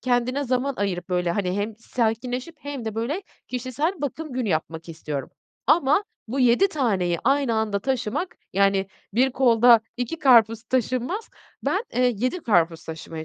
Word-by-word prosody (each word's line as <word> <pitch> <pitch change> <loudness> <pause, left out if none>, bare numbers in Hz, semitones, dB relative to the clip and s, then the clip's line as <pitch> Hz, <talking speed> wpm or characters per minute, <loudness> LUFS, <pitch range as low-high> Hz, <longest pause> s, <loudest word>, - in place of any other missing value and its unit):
kendine 255 +3 0
zaman 255 +2 0
ayırıp 185 -3 -2
böyle, 180 -1 0
hani, 185 0 -1
hem 210 +1 -3
sakinleşip 245 +6 -2
hem 285 -5 -6
de 220 - -4
böyle 255 - -2 0.3
kişisel 255 +7 -1
bakım 300 +1 -4
günü 245 -4 -1
yapmak 160 0 -2
istiyorum 150 -4 -5 0.4
ama 300 +5 +4 0.2
bu 265 +4 -1
7 250 +11 +5
taneyi 195 - 0
aynı 275 -4 +2
anda 215 -2 0
taşımak, 265 - -2 0.2
yani, 195 0 +2 0.3
1 260 +3 +3
kolda 240 -3 +6 0.2
2 245 +7 -3
karpuz 230 -4 +5
taşınmaz, 255 - -1 0.3
ben, - - 0
eee, 250 -1 +3
7 255 - -1
karpuz 170 -6 +2
taşımaya 160 0 -7
240 Hz, 150 wpm, -24 LUFS, 200-265 Hz, 0.4 s, kolda